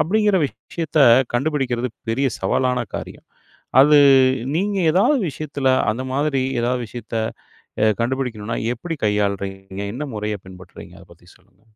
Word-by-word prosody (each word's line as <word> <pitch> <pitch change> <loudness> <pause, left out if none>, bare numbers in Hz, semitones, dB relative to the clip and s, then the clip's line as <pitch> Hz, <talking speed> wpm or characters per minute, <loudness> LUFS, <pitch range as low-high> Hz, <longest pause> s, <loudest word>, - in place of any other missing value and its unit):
அப்படிங்கிற 205 +5 +2
விஷயத்த 160 +2 -5 0.4
கண்டுபிடிக்கிறது 125 -3 -1 0.2
பெரிய 135 +5 +1
சவாலான 125 +6 +1
காரியம்! - - -7 0.5
அது 150 +1 +6 0.6
நீங்க 200 +3 -1
எதாவது 225 - +3
விஷயத்தில 140 -2 -3 0.2
அந்த 120 +4 -5
மாதிரி 140 -1 0 0.2
எதாவது 125 +1 0
விஷயத்த 115 0 -8 0.9
கண்டுபிடிக்கணும்ன்னா, 115 -3 -2 0.2
எப்படி 165 +7 -5
கையாளுறீங்க? 100 -2 -2
என்ன 140 - -5
முறைய 105 0 -3
பின்பற்றுறீங்க? 95 -1 -13
அத - - -16
பத்தி 85 +1 -21
சொல்லுங்க. 95 +2 -30
125 Hz, 115 wpm, -21 LUFS, 105-150 Hz, 0.9 s, அது